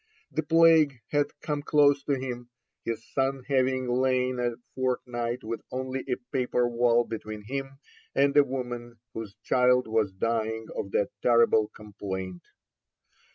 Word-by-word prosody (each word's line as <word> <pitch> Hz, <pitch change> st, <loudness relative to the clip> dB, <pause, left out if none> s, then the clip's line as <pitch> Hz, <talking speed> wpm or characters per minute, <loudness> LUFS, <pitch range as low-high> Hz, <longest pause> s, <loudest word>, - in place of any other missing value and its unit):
The 155 Hz, -, 0 dB
plague 160 Hz, -3 st, +5 dB
had 145 Hz, -1 st, +2 dB, 0.2 s
come 150 Hz, -2 st, -1 dB
close 145 Hz, -1 st, +4 dB
to 145 Hz, -, +1 dB
him, 125 Hz, -2 st, -4 dB, 0.3 s
his 115 Hz, 0 st, -4 dB
son 135 Hz, -1 st, 0 dB
having 130 Hz, -2 st, +1 dB
lain 130 Hz, 0 st, +1 dB
a 120 Hz, -1 st, 0 dB, 0.2 s
fortnight 125 Hz, -2 st, -2 dB
with 115 Hz, +1 st, -4 dB
only 130 Hz, 0 st, -3 dB
a 125 Hz, -, +2 dB, 0.2 s
paper 125 Hz, -2 st, +1 dB
wall 120 Hz, 0 st, +3 dB
between 110 Hz, -1 st, -6 dB
him 135 Hz, +4 st, -5 dB, 0.4 s
and 140 Hz, +1 st, +3 dB
a 145 Hz, -, +8 dB
woman 120 Hz, -3 st, -5 dB, 0.2 s
whose 110 Hz, -2 st, -7 dB
child 125 Hz, -1 st, +3 dB
was 110 Hz, -3 st, +1 dB
dying 110 Hz, +2 st, -1 dB
of 100 Hz, -, -3 dB
that 100 Hz, -, +2 dB
terrible 115 Hz, -3 st, +4 dB
complaint. 95 Hz, -4 st, -6 dB
125 Hz, 140 wpm, -27 LUFS, 115-135 Hz, 0.4 s, a